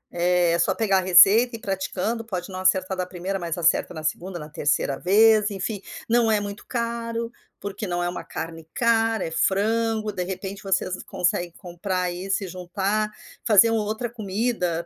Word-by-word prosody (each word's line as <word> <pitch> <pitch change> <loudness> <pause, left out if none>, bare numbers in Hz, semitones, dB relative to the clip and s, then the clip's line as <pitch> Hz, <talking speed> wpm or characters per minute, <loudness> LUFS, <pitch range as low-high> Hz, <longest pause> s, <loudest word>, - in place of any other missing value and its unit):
É 175 -1 +2
só - - +2
pegar 200 -4 +2
a - - -1
receita 200 +7 +6
e - - -5
ir - - -19
praticando, 195 +4 -2
pode 185 -5 -5
não 185 - -6
acertar 185 0 +2
da 185 -1 -2
1º 185 +2 -4
mas 170 -2 -3
acerta 170 +1 +2
na 155 -2 -7
2º, 175 +4 -3
na 150 - -8
3º 145 -3 0
vez 215 +3 +4
enfim, 200 +1 -4 0.3
não 230 -1 +3
é 215 - +3
muito 205 0 -7
caro, 230 -1 -3 0.3
porque 200 +2 -5
não 175 0 -2
é - - 0
uma 175 - -5
carne 165 0 -7
cara, 225 -2 +2
é 160 - -5
frango, 215 +4 +1
de 180 - -2
repente 195 +2 -6
vocês 190 -1 -1
conseguem 175 0 -1
comprar 180 +1 -3
isso 190 +3 -2
e 190 - -5
juntar, 195 +4 -2 0.3
fazer 225 0 +6
uma 225 -1 +1
outra 220 +3 -3
comida, 200 -6 -2
195 Hz, 180 wpm, -24 LUFS, 180-220 Hz, 0.3 s, receita